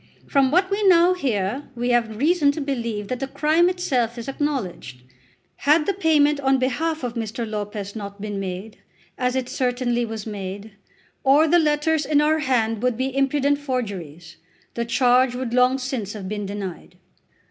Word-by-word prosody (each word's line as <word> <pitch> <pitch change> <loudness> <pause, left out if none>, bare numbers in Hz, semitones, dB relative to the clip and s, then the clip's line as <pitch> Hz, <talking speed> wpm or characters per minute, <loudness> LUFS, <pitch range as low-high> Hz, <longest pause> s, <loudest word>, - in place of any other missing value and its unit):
From 275 -2 +3
what 370 +6 +2
we 400 +2 0
now 350 0 +6
hear 255 - -2
we 245 +1 -2
have 230 -3 +1
reason 295 +2 +3
to 310 - -5
believe 235 -7 -3
that 250 +2 -3
the 270 - -3
crime 310 +5 +2
itself 250 -10 -1
is 235 - -7
acknowledged. 245 - -4 0.5
Had 300 +2 +3
the 400 - +1
payment 300 -5 +3
on 270 -1 +2
behalf 310 +4 -1
of 245 -2 -3
Mr. 230 0 -4
Lopez 205 -1 -5
not 200 -2 -7
been 205 -1 -4
made, 195 +3 -6 0.4
as 250 0 -1
it 260 -1 -1
certainly 245 -2 -1
was 225 -2 -5
made, 205 0 -6 0.5
or 285 +4 +5
the 345 +3 +5
letters 305 0 +1
in 290 +1 +2
our 310 +1 +3
hand 225 -6 0
would 250 -2 0
be 260 +1 -2
impudent 280 +1 +1
forgeries, 200 - -5 0.4
the 235 - -2
charge 250 +1 +3
would 250 -2 -4
long 250 +1 +4
since 255 -6 -4
have 200 -3 -7
been 205 0 -4
denied. 195 -3 -7
250 Hz, 170 wpm, -23 LUFS, 215-290 Hz, 0.5 s, now